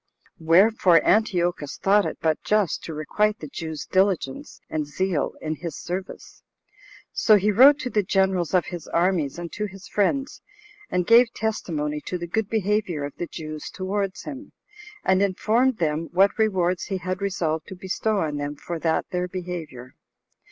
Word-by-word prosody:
Wherefore 180 +3 +5
Antiochus 175 -8 +1
thought 200 +1 +3
it - - -5
but 160 -1 0
just 210 -5 +1
to 165 - -6
requite 210 +8 0
the 155 - -8
Jews' 160 +1 -6
diligence 185 -8 0
and 155 -2 -3
zeal 180 +1 -1
in 155 0 -2
his 170 -2 -6
service. 185 +2 -7 0.7
So 215 - +5
he 210 +1 +3
wrote 270 +7 +7
to 250 - -4
the 210 - +2
generals 190 -2 +1
of 180 - +3
his 175 -3 -7
armies, 170 -4 0
and 170 -1 -6
to 210 0 -3
his 195 -1 -12
friends, 270 +7 -1 0.5
and 180 -1 0
gave 235 +3 +6
testimony 150 -9 -2
to 180 - -2
the 175 - -5
good 210 +4 -2
behavior 210 -7 0
of 145 - -5
the 175 - -4
Jews 155 -2 -7
towards 195 0 -3
him, 285 0 -8 0.5
and 190 0 +3
informed 220 +6 +2
them 160 0 -1
what 195 +3 +4
rewards 185 -5 +1
he 195 - -3
had 185 +1 -4
resolved 165 -5 -1
to 190 - -8
bestow 195 +3 -1
on 150 -2 -2
them 145 0 -4
for 170 +3 -6
that 160 0 0
their 180 -1 -1
behavior. 170 -9 -7
185 Hz, 165 wpm, -24 LUFS, 160-205 Hz, 0.7 s, wrote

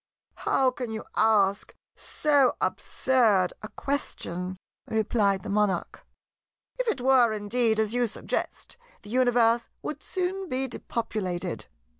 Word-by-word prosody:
"How 260 -1 +4
can 250 -2 -5
you 220 0 -4
ask 205 -2 +2 0.2
so 285 -4 +2
absurd 200 +1 +2
a 215 - -6
question?" 185 -10 -3 0.3
replied 210 -3 +1
the - - -6
Monarch. 205 -1 0 0.8
"If - - -1
it 425 - 0
were 255 -3 +5
indeed 220 +2 +1
as 220 0 +1
you 245 -1 +2
suggest, 220 - -4 0.3
the 205 - -10
Universe 240 -2 +3
would 300 -1 -5
soon 375 0 -3
be 265 +1 0
depopulated. 190 -8 -4
225 Hz, 120 wpm, -27 LUFS, 205-255 Hz, 0.8 s, were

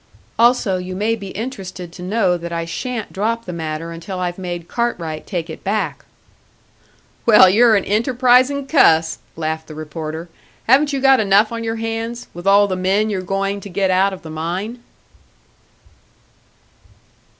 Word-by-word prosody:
"Also 230 -6 +3
you 185 0 -6
may 215 +4 0
be 200 -3 -8
interested 190 -5 -6
to 180 - -11
know 185 -1 +1
that 170 0 -6
I 165 0 -2
shan't 225 +7 -5
drop 230 +4 -1
the 180 - -6
matter 160 0 -4
until 170 +3 -7
I've 180 0 -3
made 175 -2 -5
Cartwright 170 -10 -3
take 175 -4 -3
it 160 - -9
back." 190 -9 -2 1.2
"Well, 210 -4 +8
you're 225 +4 +5
an 200 - +1
enterprising 255 +5 +3
cuss!" 165 - +3 0.2
laughed 160 0 -3
the 155 - -10
reporter. 155 +2 -6 0.4
"Haven't 280 +5 +4
you 275 -2 -2
got 270 -1 +5
enough 205 +1 +3
on 230 0 -4
your 225 0 -2
hands, 225 +1 -4
with 175 +2 -7
all 200 +1 +6
the 185 - -2
men 195 +4 +1
you're 190 -2 -2
going 195 +2 -2
to 200 - -9
get 190 +1 0
out 190 +2 +3
of 190 - -9
the 160 - -8
mine?" 180 +9 -4
195 Hz, 160 wpm, -19 LUFS, 170-225 Hz, 1.2 s, Well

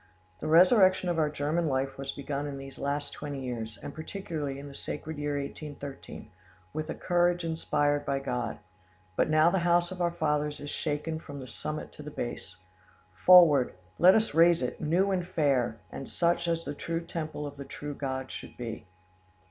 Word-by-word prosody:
The - - -4
resurrection 185 +2 +6
of 170 -2 0
our 155 -1 +3
German 150 +3 0
life 135 -1 0
was 135 0 -3
begun 140 +1 -4
in 140 -1 -5
these 135 0 -9
last 145 +1 -2
twenty 145 -2 -5
years, 115 -4 -5
and 145 - -6
particularly 155 -4 -4
in 140 +1 -8
the 140 - -10
sacred 150 +2 -5
year 145 0 -1
1813, 140 -1 -8 0.4
with 155 +1 -3
a - - -3
courage 175 0 +2
inspired 145 -3 +1
by 140 - 0
God. 125 -4 -2 0.6
But - - +2
now 155 +2 +5
the 190 - +2
house 175 0 +2
of 185 -1 -5
our 175 - +3
fathers 150 -3 -1
is 145 - -6
shaken 155 +1 -2
from 145 -3 -9
the 130 - -7
summit 155 +4 -5
to - - -11
the 150 - -7
base. 120 -8 -5 0.6
Forward! 150 - +7 0.2
let 185 +2 +8
us 220 -5 +2
raise 165 -2 +5
it, 125 - -3
new 180 +6 +2
and 185 -2 +1
fair, 140 -10 +1
and 135 - -7
such 170 0 +1
as 165 0 0
the 145 - -3
true 165 +3 -3
temple 155 -3 -5
of 145 -1 -7
the 140 - -6
true 145 +1 -6
God 130 -2 -4
should - - -9
be. 115 -5 -6
150 Hz, 190 wpm, -29 LUFS, 140-170 Hz, 0.6 s, let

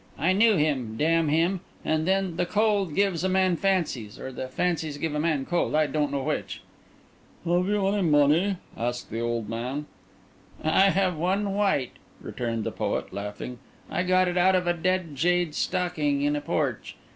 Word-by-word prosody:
"I 170 +6 +2
knew 215 +2 +5
him—damn 150 +2 +1
him! 170 +5 +2 0.3
And 155 +1 0
then 190 -2 +1
the 175 - -1
cold 205 -6 +1
gives 195 -4 +1
a 190 - +1
man 185 -1 +2
fancies—or 155 - -2
the 130 0 -5
fancies 160 +1 -1
give 155 +1 -2
a 150 - -1
man 150 -4 0
cold, 175 -1 0
I 155 0 +4
don't 145 0 -1
know 140 -1 -2
which." - - -3 0.8
"Have 175 +2 +2
you 205 -1 +1
any 200 +1 +1
money?" 160 +4 +3 0.2
asked 120 +1 -3
the 115 - -3
old 115 -2 -2
man. 125 +6 -4 0.8
"I 190 +5 +4
have 190 -2 +1
one 195 +5 0
white," 195 -11 +1 0.3
returned 115 -2 -3
the - - -3
poet, - - -3
laughing. 105 +5 -6 0.3
"I - - 0
got 185 0 +3
it 180 0 0
out 190 +1 +4
of 180 -1 +1
a 175 - +2
dead 175 -2 -1
jade's 175 +2 +1
stocking 160 -6 0
in 145 +1 +1
a 145 - -2
porch. - - -2
165 Hz, 175 wpm, -26 LUFS, 145-185 Hz, 0.8 s, knew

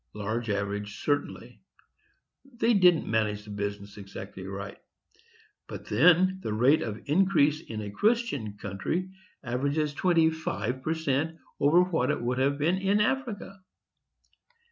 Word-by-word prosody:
_,—large 110 +3 -3
average, 100 0 -3
certainly; 145 -1 -3 0.8
they 240 -3 0
didn't 180 -5 +5
manage 105 -2 0
the 105 - -9
business 100 0 -5
exactly 95 -1 -9
right; 100 0 -7 0.9
but - - -8
then 185 +2 +4
the 110 - -3
rate 130 +7 +4
of 110 -1 -5
increase 155 -2 +3
in 110 -8 -6
a 105 -1 -6
Christian 145 - 0
country 135 - -3 0.3
averages 140 +4 -1
twenty 165 0 +3
five 130 -5 -3
per 160 +4 -1
cent. 160 +1 -1 0.2
over 155 +5 +5
what 180 -4 0
it 150 - 0
would 125 +2 -1
have 140 +2 +2
been 170 +6 +1
in 195 +2 +2
Africa. 210 -4 -2
145 Hz, 135 wpm, -28 LUFS, -, 0.9 s, didn't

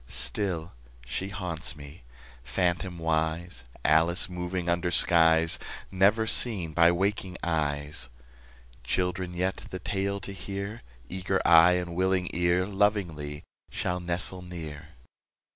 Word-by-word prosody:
Still 80 +8 -3 0.3
she 95 +10 -4
haunts 90 -6 -2
me, 75 +2 -12 0.4
phantomwise, 85 0 -1 0.2
Alice 80 +3 +3
moving 90 0 -4
under 85 +1 +1
skies 80 -1 +5 0.3
Never 100 +4 +3
seen 100 -8 +3
by 85 +1 +5
waking 95 0 -1
eyes. 75 -4 -1 0.7
Children 90 +5 -2
yet, 95 +2 -1
the 95 - -5
tale 100 +2 -2
to 95 - -7
hear, 100 +3 -6 0.3
Eager 95 +2 -1
eye 85 +1 +7
and 90 -1 -2
willing 95 0 +1
ear, 85 +2 +2
Lovingly 95 -8 -1 0.3
shall 90 0 -2
nestle 90 +1 -1
near. 80 -4 -8
90 Hz, 110 wpm, -28 LUFS, 80-95 Hz, 0.7 s, eye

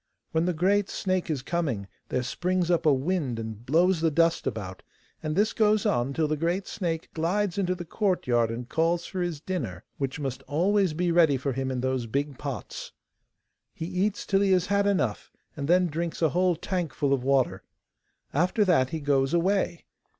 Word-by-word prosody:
When 160 +1 +1
the 180 - +1
great 195 +5 +2
snake 185 -2 -1
is 145 -5 -2
coming 140 - -2 0.2
there 130 0 0
springs 175 +7 0
up 170 -1 +2
a - - +7
wind, 140 -2 0
and 110 -1 -6
blows 165 +6 +3
the 165 - +3
dust 165 +2 +2
about, 95 -4 -4 0.4
and 155 -1 -2
this 210 +3 +2
goes 215 -1 +3
on 120 +2 +1
till 155 +2 +1
the 155 - 0
great 170 +5 -1
snake 165 -5 -3
glides 180 +4 0
into 185 -1 +1
the 175 -1 -7
courtyard 140 - +1
and 120 +1 -5
calls 165 +3 +1
for 185 -2 -4
his 175 -4 -2
dinner, 130 - -4 0.2
which 135 +1 -2
must 135 -3 -3
always 185 +3 +2
be 175 +1 +1
ready 165 -5 +5
for 135 +1 -2
him 135 +1 -2
in 130 -1 -2
those 130 -2 -1
big 140 +3 -2
pots. 135 -9 -6 0.8
He 160 - -4
eats 190 +4 -1
till 195 -1 +2
he 195 -1 +4
has 180 -1 +3
had 200 +1 +2
enough, 130 - 0 0.2
and 140 -2 -4
then 180 +2 +4
drinks 170 +1 -3
a 160 - +5
whole 180 +2 +2
tankful 160 -5 -1
of 130 -2 0
water. 135 -1 +2 0.7
After 185 - +2
that 145 -9 +3
he 160 +1 -4
goes 140 +1 +2
away. 180 0 +1
165 Hz, 190 wpm, -27 LUFS, 135-185 Hz, 0.8 s, a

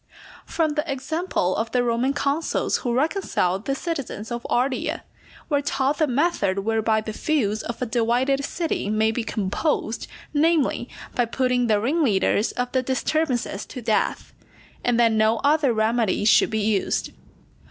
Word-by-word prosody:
_ - - -23
From 320 -2 +1
the 300 0 -2
example 275 - -1
of 225 +1 -1
the 245 +2 +1
Roman 240 +3 +1
consuls 285 +3 0
who 245 - -3
reconciled 240 - 0
the 275 - 0
citizens 275 - -4
of 240 0 -4
Ardea, 255 +2 0 0.4
we 285 - +2
are - - -3
taught 280 +1 0
the 310 - +3
method 250 - +1
whereby 220 0 +1
the 215 0 -6
feuds 215 -7 0
of 235 - -6
a - - 0
divided 245 +4 +1
city 325 - -2
may 215 +1 +2
be 230 +1 -2
composed, 215 - -2 0.3
namely, 300 -5 +2 0.2
by 245 - +1
putting 250 +1 0
the 215 -2 +3
ringleaders 230 - +1
of 245 0 -2
the 260 - +1
disturbances 260 -4 -1
to - - -7
death; 225 -3 -1 0.5
and 240 -1 +2
that 230 -1 +5
no 220 +1 +3
other 290 -2 +3
remedy 220 -2 +1
should 220 - +5
be 220 -1 -1
used. 205 -2 0
245 Hz, 160 wpm, -23 LUFS, 220-280 Hz, 0.5 s, that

